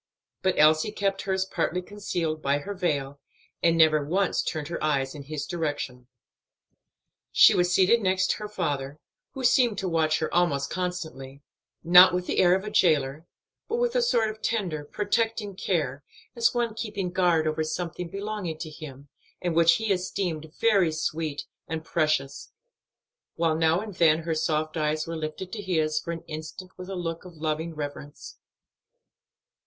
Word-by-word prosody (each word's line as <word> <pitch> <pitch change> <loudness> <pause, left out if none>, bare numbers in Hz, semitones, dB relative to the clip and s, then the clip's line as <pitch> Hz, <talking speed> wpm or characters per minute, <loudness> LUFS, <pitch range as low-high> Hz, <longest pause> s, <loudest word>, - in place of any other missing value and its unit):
But 190 -1 +1
Elsie 155 +6 +4
kept 195 -2 -1
hers 190 -1 -1
partly 180 -1 -2
concealed 175 -6 -3
by 140 0 +1
her 200 +8 -5
veil, 145 -7 -2 0.4
and 165 0 +3
never 155 -2 +5
once 185 +6 +1
turned 155 -3 -3
her 170 - -4
eyes 135 -3 0
in 150 - -8
his 145 +1 -5
direction. 145 -8 -4 1.2
She - - +7
was 180 0 +2
seated 195 +6 +4
next 185 -1 +2
her 210 - -6
father, 145 -8 -3 0.4
who 265 - -5
seemed 245 -3 +3
to 190 - -2
watch 160 -2 +2
her 160 - -3
almost 140 -6 +1
constantly 160 -7 -5 0.4
not 180 +2 +8
with 180 0 -2
the - - -1
air 180 0 +5
of 190 - -2
a 210 - -5
jailer, 155 -3 +2 0.4
but 455 - -2
with 480 0 0
a - - +3
sort 230 - +2
of 215 0 -14
tender, 180 -11 -2
protecting 210 +3 -1
care, 145 -8 -2 0.3
as 235 0 +3
one 240 -2 -1
keeping 205 -5 -4
guard 175 -4 +2
over 155 0 0
something 170 +2 -4
belonging 200 -4 -4
to 155 -1 -7
him, 140 -2 -10 0.3
and 175 -2 -2
which 165 0 +6
he 220 -2 0
esteemed 180 -4 -3
very 200 -7 +3
sweet 155 -1 -3 0.2
and 160 0 -4
precious, 155 -5 -1 0.8
while 165 -1 +1
now 160 +1 +3
and 215 -1 -7
then 160 -1 +4
her 165 0 -1
soft 155 0 -1
eyes 155 0 0
were 165 - -5
lifted 160 +4 -5
to 215 - -5
his 160 -5 0
for 170 - -5
an 165 0 -6
instant 160 +3 -8
with 185 +1 -9
a 195 - -4
look 165 -2 -4
of 180 -2 -12
loving 160 +1 -3
reverence. 145 0 -8
165 Hz, 170 wpm, -26 LUFS, 155-190 Hz, 1.2 s, not